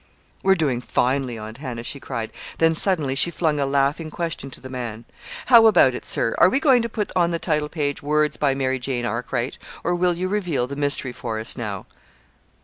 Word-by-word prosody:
"We're 190 0 +4
doing 140 -8 0
finely, 125 -1 0
Aunt 110 +2 -8
Hannah," 125 -5 -5
she 140 - -4
cried. 115 -4 -5 0.3
Then, 165 0 +4
suddenly, 160 -6 0
she 140 +5 +2
flung 155 -3 0
a 140 - +1
laughing 140 +3 +1
question 160 -4 -4
to - - -7
the 130 - -9
man. 120 -3 -6 0.4
"How 230 -3 +8
about 140 - +5
it, - - -6
sir? 115 - 0
Are - - +7
we 265 - +1
going 265 -5 +5
to 230 - -2
put 210 -2 -3
on 175 -2 +3
the 170 - -1
title 150 -3 -1
page: 145 -3 -2
'Words 150 +1 +1
by 140 -2 +1
Mary 130 -1 0
Jane 125 -1 -2
Arkwright' 120 +2 -3 0.2
or - - +1
will 175 0 +2
you 185 +2 -2
unveil 175 -11 0
the 140 +3 -6
mystery 145 -2 0
for 115 -3 -4
us 110 - -2
now?" 105 -5 -5
140 Hz, 210 wpm, -23 LUFS, 125-170 Hz, 0.4 s, How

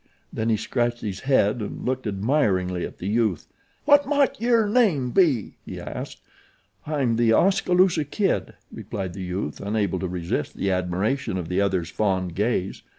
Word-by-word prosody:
Then 110 +1 -1
he 110 - +2
scratched 120 +2 -1
his 100 -4 -4
head 120 -5 +2
and 105 - -6
looked 130 -2 -2
admiringly 95 - 0
at - - -15
the - - -7
youth. 105 -5 0 0.4
"What 290 -1 +5
mought 280 -6 +1
yer 230 -2 +3
name 195 - +2
be?" 150 - +2
he - - -7
asked. - - -7 0.7
"I'm 135 -7 0
The 115 -1 +4
Oskaloosa 180 - +3
Kid," 195 +7 -1 0.2
replied 95 -3 -5
the 95 - -7
youth, 90 -4 -4
unable 100 -2 -1
to 95 - -2
resist 85 -1 -3
the 100 - 0
admiration 95 +6 -1
of 85 -3 -5
the 90 +2 +1
other's 95 -4 0
fond 95 -4 0
gaze. 100 -1 -1
110 Hz, 160 wpm, -24 LUFS, 95-145 Hz, 0.7 s, What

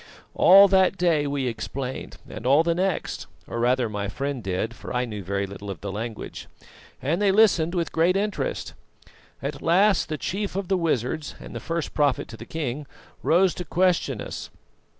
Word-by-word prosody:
All 195 +2 +8
that 190 0 +3
day 165 -5 +2
we 140 -2 -1
explained 125 +2 -4
and - - -8
all 140 +5 +5
the 170 0 +2
next 185 +1 -2 0.2
or 115 - -5
rather 125 +1 +2
my 105 -1 -3
friend 140 +4 -3
did, 95 +3 -2
for - - -9
I 125 0 0
knew 105 -4 -6
very 100 +2 -1
little 100 +1 -8
of 95 - -6
the 100 0 -4
language 110 +2 -6 0.6
and 165 +8 0
they 200 -2 +4
listened 190 -5 +4
with 170 -2 -1
great 170 +4 +3
interest. 210 - -2 0.7
At - - -4
last 190 +3 +3
the 155 - -2
chief 195 +5 -3
of 195 -2 -3
the 195 - +3
wizards 155 -2 -1
and - - -10
the - - -3
first 165 -1 -3
prophet 145 -3 +1
to 115 - -9
the 115 - -10
king 145 -2 -4 0.3
rose 180 +2 +4
to 180 - -5
question 175 - +1
us. - - -6
150 Hz, 185 wpm, -25 LUFS, 120-180 Hz, 0.7 s, All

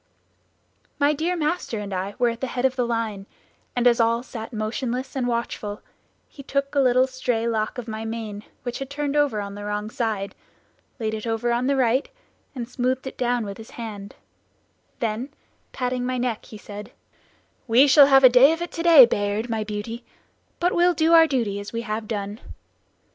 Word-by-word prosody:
"My 290 +1 +3
dear 330 +5 -1
master 315 -6 -2
and 205 -1 -5
I 190 +2 -3
were 245 -1 +3
at 230 +1 -6
the 265 - -1
head 245 +1 -2
of 260 0 +2
the 250 -2 0
line, 220 -4 -3 0.5
and 245 -1 0
as 240 -1 +5
all 230 +1 +2
sat 225 -3 -8
motionless 245 +4 -3
and 255 -2 -1
watchful, 235 -3 -3 0.4
he 280 - -12
took 275 +1 -2
a 285 - +2
little 255 -1 +4
stray 250 -3 -2
lock 220 0 -1
of 245 -1 -6
my 220 0 -5
mane 220 -2 -5 0.2
which 245 -1 -4
had 270 -1 -5
turned 285 0 -3
over 290 -7 +2
on 200 0 -6
the 205 0 -8
wrong 210 +1 -3
side, 215 -5 -2 0.7
laid 220 -1 -2
it 220 +1 -4
over 225 +1 0
on 240 +2 0
the 280 - +2
right, 260 - +1 0.5
and 240 -3 -4
smoothed 255 +1 -1
it 265 - -6
down 245 -2 0
with 200 +1 -7
his 220 - -11
hand; 210 -4 -7 0.9
then 230 +3 -2 0.4
patting 250 -1 -2
my 255 0 -1
neck, 245 -3 -2
he 215 - -11
said, 205 0 -9 0.8
'We 245 +4 +6
shall 280 0 +7
have 270 -1 +6
a - - +11
day 255 +5 +6
of 330 - -5
it 345 - -6
to 330 - -4
day, 330 -6 +9
Bayard, 210 +1 -1
my 220 -1 -1
beauty; 215 +3 -5 0.6
but 355 +1 +1
we'll 350 0 +3
do 320 +2 +3
our 325 -1 +8
duty 230 -8 -1
as 205 - -7
we 230 - -3
have 215 -1 -4
done.' 205 -1 -4
240 Hz, 195 wpm, -24 LUFS, 215-265 Hz, 0.9 s, a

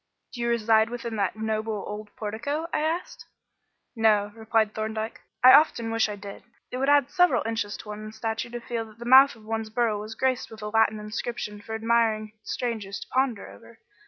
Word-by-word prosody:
"Do 240 - -6
you 235 - 0
reside 225 -1 +3
within 235 -1 -5
that 200 0 0
noble 220 -1 -2
old 210 0 -6
portico?" 235 +9 -3
I - - +1
asked. 320 +4 -3 0.7
"No," 210 -2 +3
replied 220 -1 0
Thorndyke. 220 0 -4 0.2
"I 255 - +10
often 235 -7 +4
wish 225 -1 +2
I 210 - -4
did. 200 0 -9 0.3
It 250 - -3
would 270 +2 +1
add 285 -2 +4
several 355 -9 +3
inches 225 -2 -2
to 210 - -11
one's 215 +1 -7
stature 225 +1 -3
to 240 0 -5
feel 235 -1 -4
that 215 -1 -16
the 235 - -9
mouth 265 +2 +7
of 220 -2 -17
one's 220 0 -3
burrow 220 -2 0
was 215 +2 -7
graced 260 +1 0
with 220 -1 -11
a 210 - -3
Latin 220 0 +2
inscription 210 0 -5
for 220 +2 -6
admiring 220 -1 +1
strangers 220 -5 -4
to - - -8
ponder 255 -5 0
over. 100 +1 -15
225 Hz, 195 wpm, -26 LUFS, 215-235 Hz, 0.7 s, I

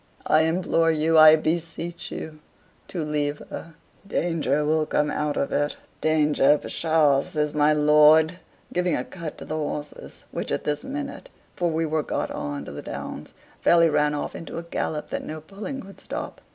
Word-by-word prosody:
I 155 +1 +4
implore 165 0 +2
you, 160 +1 +2
I 155 0 +9
beseech 165 +2 -3
you, 155 -1 -7 0.5
to 170 -4 -4
leave 150 -1 -1
her. 165 -1 -8 0.3
Danger 150 -6 0
will 155 0 +1
come 150 0 +1
out 150 -1 -1
of 140 - -1
it." 145 0 0 0.2
"Danger, 150 -2 +4
psha!" 155 -4 +2
says 150 0 -2
my 150 0 +4
lord, 150 +3 +5 0.3
giving 180 -1 +1
a 125 - -2
cut 165 -2 -8
to - - -9
the - - -5
horses, 150 -1 -5
which - - -4
at - - -1
this 150 - -2
minute 285 - -6 0.3
for 175 -1 0
we 165 0 0
were 155 0 0
got - - -3
on 70 0 -4
to - - -8
the 70 - -7
Downs - - -7 0.3
fairly 170 -1 +5
ran 150 0 +2
off 145 - -4
into 165 - -7
a 170 - -4
gallop 160 -2 -3
that - - -3
no 155 0 -6
pulling 205 - -7
could 195 0 -13
stop. - - -6
155 Hz, 180 wpm, -25 LUFS, 150-165 Hz, 0.5 s, I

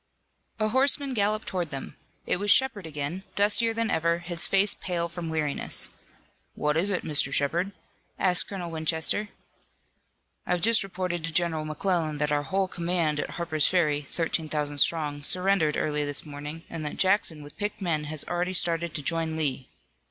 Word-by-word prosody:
A 215 0 +1
horseman 275 +3 +4
galloped 215 -1 +1
toward 175 -4 -2
them. 135 -2 -6 0.3
It - - +2
was 205 +2 -3
Shepard 205 -7 +4
again, 150 +4 -4
dustier 210 +3 +4
than 225 0 -1
ever, 170 +1 +1
his 170 0 0
face 195 +1 +4
pale 170 -2 -2
from 170 -1 -6
weariness. 155 -3 -1 0.7
"What 150 0 0
is 175 +5 +2
it, 190 -3 -1
Mr. 150 -2 +2
Shepard?" 170 +7 0 0.5
asked 180 -2 +3
Colonel 180 -4 -5
Winchester. 160 +6 -1 1.2
"I've 180 -1 0
just 230 +3 +5
reported 180 -3 -4
to 165 - -4
General 160 -2 0
McClellan 155 0 -1
that 150 0 -1
our 145 0 +2
whole 190 +7 -1
command 170 -4 -1
at - - -3
Harper's 160 -4 0
Ferry, 155 -5 +2
thirteen 160 +2 -2
thousand 145 -1 -2
strong, 150 -2 +1
surrendered 180 -1 +3
early 150 -1 0
this 145 +1 +2
morning 150 +2 -7
and 165 -2 -6
that 150 - -5
Jackson 185 -6 +1
with 145 - -12
picked 205 0 -3
men 165 -6 -1
has 150 0 +1
already 180 +1 -2
started 170 -2 +1
to 145 - -3
join 165 +1 -1
Lee!" 135 -4 -2
170 Hz, 170 wpm, -27 LUFS, 150-190 Hz, 1.2 s, just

